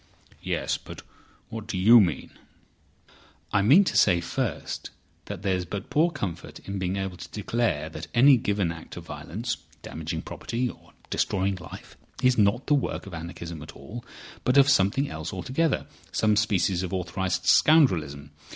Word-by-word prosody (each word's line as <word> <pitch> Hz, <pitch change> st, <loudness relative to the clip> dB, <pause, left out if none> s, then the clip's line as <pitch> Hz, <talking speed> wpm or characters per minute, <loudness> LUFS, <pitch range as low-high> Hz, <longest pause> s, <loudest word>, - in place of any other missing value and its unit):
"Yes. -, -, -1 dB
But -, -, -10 dB, 0.5 s
what 110 Hz, -1 st, -7 dB
do 105 Hz, -, -3 dB
you 115 Hz, +6 st, +8 dB
mean?" 85 Hz, -8 st, -1 dB, 1.2 s
"I 100 Hz, -, +4 dB
mean 140 Hz, -, +7 dB
to -, -, -2 dB
say, 90 Hz, -4 st, +5 dB
first, 85 Hz, 0 st, -3 dB, 0.4 s
that 90 Hz, -, -7 dB
there's 95 Hz, -2 st, 0 dB
but 95 Hz, +3 st, -6 dB
poor 160 Hz, +4 st, +4 dB
comfort 100 Hz, -, -5 dB
in 100 Hz, 0 st, -6 dB
being 95 Hz, 0 st, -1 dB
able 95 Hz, -2 st, -3 dB
to -, -, -9 dB
declare 105 Hz, -8 st, -1 dB
that 80 Hz, 0 st, -8 dB
any 135 Hz, +3 st, +7 dB
given 100 Hz, -6 st, 0 dB
act 85 Hz, +1 st, -10 dB
of 85 Hz, -, -8 dB
violence—damaging 80 Hz, -1 st, -6 dB
property 125 Hz, +2 st, -3 dB
or -, -, -11 dB, 0.2 s
destroying 95 Hz, 0 st, 0 dB
life—is 125 Hz, +7 st, -3 dB
not 105 Hz, +4 st, +2 dB
the 150 Hz, -, +2 dB
work 140 Hz, -, -1 dB
of 100 Hz, -, -10 dB
anarchism 85 Hz, -1 st, -7 dB
at 75 Hz, -, -10 dB
all, 120 Hz, +2 st, -9 dB, 0.4 s
but 125 Hz, +2 st, +2 dB
of 140 Hz, 0 st, +7 dB
something 130 Hz, +4 st, +3 dB
else 80 Hz, -, -5 dB
altogether—some 110 Hz, -, -1 dB
species 100 Hz, -3 st, +1 dB
of 90 Hz, -2 st, -4 dB
authorised 90 Hz, 0 st, -2 dB
scoundrelism. 80 Hz, -, +4 dB
95 Hz, 150 wpm, -26 LUFS, 85-115 Hz, 1.2 s, you